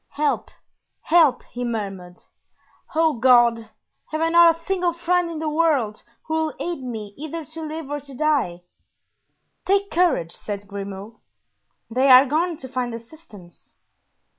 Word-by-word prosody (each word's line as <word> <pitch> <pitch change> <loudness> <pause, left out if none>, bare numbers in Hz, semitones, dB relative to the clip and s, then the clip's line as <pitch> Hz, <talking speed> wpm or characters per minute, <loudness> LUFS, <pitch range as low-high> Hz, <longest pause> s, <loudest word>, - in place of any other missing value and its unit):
"Help, 295 0 0 0.5
help," 310 -6 +3
he 245 - -7
murmured; 195 -6 -5 0.8
"oh, 320 -1 +3
God! 240 -2 +5 0.5
have 310 - -2
I 325 0 +1
not 340 0 +6
a - - -17
single 360 -3 0
friend 350 +1 0
in 330 - -6
the 315 0 -3
world 300 -9 +1 0.2
who 315 - -4
will 320 -1 -1
aid 345 -5 -4
me 220 -5 -6
either 315 +1 -6
to 315 +3 -9
live 310 -2 -6
or 290 - -2
to 280 -1 -12
die?" 260 - 0 1.0
"Take 400 +1 +1
courage," 320 - +1
said 205 +2 -6
Grimaud; 200 +2 -8 0.7
"they 260 +4 +1
are 255 +1 +9
gone 325 +4 0
to 260 - -8
find 250 -2 -3
assistance." 225 - -15
285 Hz, 145 wpm, -22 LUFS, 230-325 Hz, 1.0 s, are